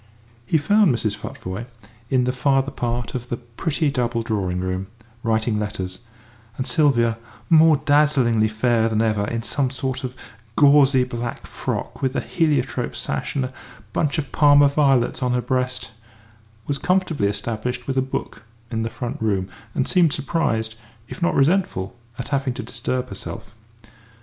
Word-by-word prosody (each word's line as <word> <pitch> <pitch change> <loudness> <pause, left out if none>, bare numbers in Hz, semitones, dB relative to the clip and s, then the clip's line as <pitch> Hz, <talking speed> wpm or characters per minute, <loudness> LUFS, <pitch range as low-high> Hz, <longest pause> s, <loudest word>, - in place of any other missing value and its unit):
He 160 - +3
found 205 +5 +4
Mrs. 110 -2 -1
Futvoye 100 +1 -6 0.4
in 130 -2 +3
the 125 - +1
farther 135 +1 +1
part 120 0 -3
of 125 -1 -5
the 120 - -2
pretty 140 +6 -2
double 120 -3 -1
drawing 100 -6 -1
room, 95 +1 -2 0.3
writing 110 -1 +1
letters, 95 -3 -4 0.6
and 130 - -2
Sylvia, 120 -4 +3 0.3
more 160 -1 +7
dazzlingly 135 -7 +3
fair 115 +1 +1
than 110 0 +1
ever 105 -2 +1
in 115 +1 -3
some 135 +2 0
sort 130 0 -3
of 130 0 -4 0.4
gauzy 140 -2 +6
black 120 -1 -5
frock - - -4
with 130 0 0
a - - +2
heliotrope 150 -6 0
sash 70 - -3
and 135 -2 +1
a 130 - -7 0.4
bunch 150 -1 0
of 145 -3 -3
Parma 145 -1 +6
violets 135 -4 +2
on 125 -1 +1
her 125 - +2
breast, 125 -1 -2 0.7
was 140 -1 -2
comfortably 180 - +1
established 115 +4 -3
with 135 - -2
a 130 - +3
book 130 -4 -4 0.3
in 115 -1 -1
the 115 - -2
front 120 +1 -5
room, 100 -4 0 0.3
and 130 - +1
seemed 170 -5 +4
surprised, 130 -7 0 0.4
if - - -8
not 170 - +2
resentful, 140 - +1 0.2
at 125 - -5
having 135 -3 0
to 125 - -5
disturb 125 +2 -3
herself. 95 0 -8
125 Hz, 160 wpm, -22 LUFS, 110-140 Hz, 0.7 s, more